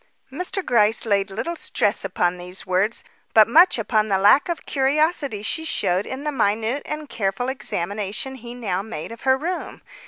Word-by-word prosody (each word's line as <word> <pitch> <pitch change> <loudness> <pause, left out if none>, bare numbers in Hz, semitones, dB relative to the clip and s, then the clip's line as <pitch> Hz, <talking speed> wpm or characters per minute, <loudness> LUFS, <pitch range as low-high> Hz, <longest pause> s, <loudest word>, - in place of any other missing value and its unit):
Mr. 360 +5 -3
Gryce 225 -1 +3
laid 200 -2 +1
little 280 - -4
stress 230 -8 0
upon 180 -2 -1
these 180 +1 -5
words, 190 +5 0 0.3
but 220 -1 +8
much 335 +8 +6
upon 220 -1 +1
the 195 -2 +2
lack 205 - +5
of 340 - -3
curiosity 280 - 0
she 320 +8 -1
showed 190 - 0
in 265 +2 -5
the 300 - -1
minute 225 +2 0
and 305 0 -5
careful 210 +2 -2
examination 210 0 -3
he 240 -2 -9
now 195 -7 -2
made 200 -4 -7
of 230 - -10
her 265 0 +3
room. 350 +6 -5
225 Hz, 175 wpm, -22 LUFS, 200-280 Hz, 0.3 s, but